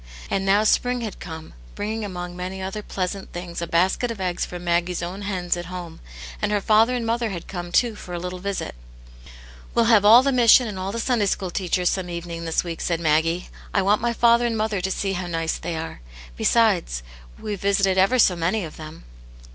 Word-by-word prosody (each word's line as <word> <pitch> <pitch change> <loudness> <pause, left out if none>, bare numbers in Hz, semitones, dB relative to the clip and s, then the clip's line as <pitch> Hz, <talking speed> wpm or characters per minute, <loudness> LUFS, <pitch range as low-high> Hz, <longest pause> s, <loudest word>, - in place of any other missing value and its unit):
And 195 0 0
now 200 +2 +4
spring 245 +3 +2
had 220 -4 -5
come, 160 -2 -8 0.2
bringing 220 +2 -3
among 180 -3 -5
many 185 +1 -5
other 190 +3 -4
pleasant 190 -1 -4
things 175 -1 -6
a 170 - -3
basl<et 185 +9 +1
of 230 -3 -5
eggs 180 -2 -1
from 175 0 -8
Maggie's 175 0 0
own 185 +4 -5
hens 185 -4 -1
at 175 -1 -6
home, 175 -3 -7 0.4
and 210 - 0
her 210 - +2
father 220 +4 +4
and 240 -2 -2
mother 230 0 0
had 175 -4 -6
come, 175 -2 -6
too, 235 +4 +3
for 195 -3 -10
a - - -3
little 180 +1 -5
visit 200 +1 -3 0.5
*' - - -18
We'll 235 - +4
have 205 -2 +6
all 225 +5 +8
the 275 - +2
mission 245 -1 +6
and 200 -3 -5
all 190 +1 -3
the 230 - -4
Sunday 230 -3 +1
School 190 -1 -1
teachers 180 -1 0
some 185 -2 -3
evening 170 -1 -5
this 165 - 0
week," 170 -2 -6
said 170 -2 0
Ljaggie. 165 +2 +1
" - - -19
I 195 - +3
want 205 +2 +3
my 235 0 +1
father 235 +1 +4
and 230 -1 -1
mother 215 -3 -1
to 190 - -1
see 195 +1 -1
how 180 -1 -3
n^cc 165 -1 -2
they 170 - -3
arc. 160 - -6 0.4
Besides, 185 - +2 0.4
weVe 205 -2 -4
visited 195 -1 +2
ever 195 +7 +4
so 190 -6 +5
many 175 +5 0
of 155 - -10
tiiem." 155 0 -10
190 Hz, 220 wpm, -23 LUFS, 175-215 Hz, 0.5 s, all